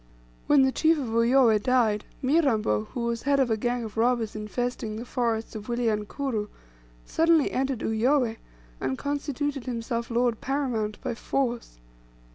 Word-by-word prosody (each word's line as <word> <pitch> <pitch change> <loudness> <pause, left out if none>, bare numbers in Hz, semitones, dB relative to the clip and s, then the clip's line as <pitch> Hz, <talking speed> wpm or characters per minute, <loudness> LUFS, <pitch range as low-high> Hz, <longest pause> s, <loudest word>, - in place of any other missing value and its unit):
When 290 -2 +6
the 265 - +3
chief 320 +4 +3
of 265 -5 -3
Uyoweh 230 -1 +4
died, 225 -4 +2 0.2
Mirambo, 245 - +2
who 240 - -6
was 235 0 -1
head 280 0 +2
of 255 -4 +2
a - - +3
gang 240 +2 -1
of 220 -1 -8
robbers 230 -2 +1
infesting 215 +1 -3
the 230 +3 -6
forests 230 -3 -1
of 215 -2 -7
Wilyankuru, 225 0 -1 0.6
suddenly 325 -2 +3
entered 265 -2 -1
Uyoweh, 230 +1 +1 0.4
and 130 0 -2
constituted 285 -1 -3
himself 235 -1 -3
lord 235 -1 +1
paramount 245 -6 -2
by - - -2
force. 240 - -2
240 Hz, 145 wpm, -26 LUFS, 220-270 Hz, 0.6 s, When